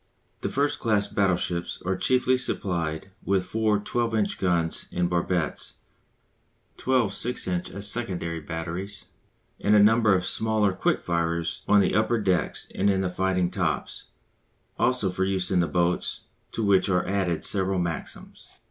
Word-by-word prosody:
The - - -2
first 145 +1 0
class 105 -3 +1
battleships 90 -3 0
are 95 +1 +1
chiefly 130 +3 +2
supplied 85 -8 -2
with 95 -2 +1
four 110 +2 +1
12 115 +2 -1
inch 105 -2 0
guns 85 -3 0
in 90 0 0
barbettes, 85 -2 -1 1.0
twelve 125 -6 +1
6 120 +1 -2
inch 90 -1 -2
as 100 +1 -3
secondary 90 -8 -2
batteries, 80 +5 -6 0.5
and 105 +1 +3
a - - +7
number 110 0 +5
of 90 -1 0
smaller 110 -2 +1
quick - - 0
firers 85 -1 -1
on 105 -1 +6
the 95 - +1
upper 110 +2 +2
decks 95 -4 -1
and 100 +2 +1
in 95 -1 +2
the 90 -1 -1
fighting 90 -1 0
tops, - - -2 0.7
also 125 -7 +2
for 95 +1 -1
use 95 -1 0
in 90 - +3
the 85 - +2
boats, 85 +3 0 0.3
to 115 - -2
which 100 -2 +3
are 90 -1 +2
added 95 -4 -1
several 95 -1 +1
Maxims. 85 -3 -5
95 Hz, 155 wpm, -26 LUFS, 90-105 Hz, 1.0 s, a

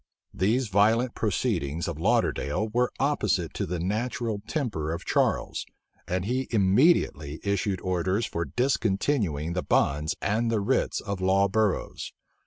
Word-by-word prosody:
These 110 +6 +1
violent 110 +5 +3
proceedings 90 - -1
of 85 -3 -4
Lauderdale 105 - +1
were 125 +3 +1
opposite 105 - 0
to - - -3
the 90 +2 -2
natural 110 - -2
temper 105 - -2
of 85 - -5
Charles - - 0 0.4
and 90 0 -1
he 130 +4 -1
immediately 95 - +2
issued 100 -1 0
orders 95 +4 0
for 85 - -3
discontinuing 100 - 0
the 90 - -1
bonds 75 0 +1
and 115 +3 0
the 115 -2 +1
writs 100 - 0
of 100 -2 -4
law 95 +1 +3
burrows. 105 0 -1
100 Hz, 135 wpm, -27 LUFS, 90-115 Hz, 0.4 s, violent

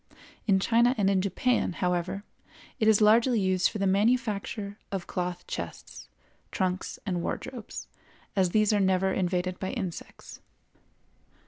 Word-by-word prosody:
In 195 -2 +4
China 235 +5 +3
and 200 -2 +3
in 190 -1 +2
Japan, 200 +2 0
however, 180 +3 -1 0.6
it 220 - +2
is 220 -1 +5
largely 225 +3 +5
used 185 -1 +2
for - - -5
the 195 - 0
manufacture 205 0 0
of 195 -3 -3
cloth 180 -1 -4
chests, - - -7 0.4
trunks 185 -1 -2
and 180 -4 -1
wardrobes, 235 +6 -5 0.5
as 190 -3 +3
these 215 +3 +3
are 205 - +3
never 190 0 +2
invaded 180 0 -1
by 190 - -3
insects. 190 -9 -6
195 Hz, 135 wpm, -28 LUFS, 185-215 Hz, 0.6 s, is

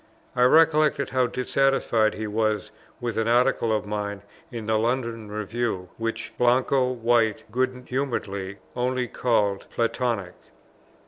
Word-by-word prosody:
I 125 - +1
recollect 155 -1 +4
how 130 -1 +2
dissatisfied 125 -3 +1
he 110 - -4
was 110 0 -1 0.3
with 120 -2 -2
an 115 - 0
Article 120 -1 +3
of 110 -1 0
mine 105 -1 -4 0.3
in 115 -3 -6
the 110 0 +1
London 115 -2 -1
Review, 105 -3 -3
which 115 0 -3
Blanco 125 +1 +3
White, 115 -3 +1
good 130 +1 -1
humouredly, 100 -7 -3 0.2
only 125 0 0
called 105 -5 0
Platonic. 115 -5 -1
115 Hz, 125 wpm, -25 LUFS, 110-125 Hz, 0.3 s, recollect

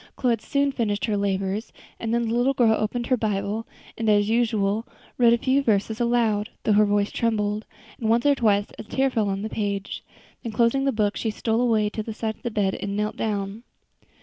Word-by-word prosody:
Chloe 250 -2 +1
had 230 -2 0
soon 280 +3 +1
finished 215 -6 -1
her 215 -3 0
labors, 200 +1 -1 0.3
and 225 - -3
then 235 0 +1
the 225 - -1
little 250 +3 +2
girl 230 -3 +4
opened 220 +3 -1
her 255 +1 +2
Bible, 210 0 -2 0.3
and, 225 -1 -1
as 205 0 +3
usual, 220 -2 +1 0.4
read 235 -1 +6
a 235 - +4
few 265 +3 +2
verses 220 -2 0
aloud, 230 -3 +1
though - - +2
her 210 0 +5
voice 205 0 +1
trembled, 215 -2 -1 0.3
and 220 - -1
once 235 +3 +3
or 290 - +6
twice 210 -6 +1
a - - -5
tear 265 +4 0
fell 215 -4 0
on 195 +1 -2
the - - -2
page; 200 -2 -3 0.4
then 230 - -5
closing 235 +5 +2
the 275 - +3
book 210 -3 0
she 225 - -2
stole 225 +2 0
away 220 -4 +2
to 215 +1 -4
the 215 0 -6
side 220 -1 -2
of - - -28
the 240 - -2
bed 205 -3 0
and 200 0 -3
knelt 210 0 -1
down. 205 0 -3
220 Hz, 220 wpm, -24 LUFS, 205-235 Hz, 0.4 s, read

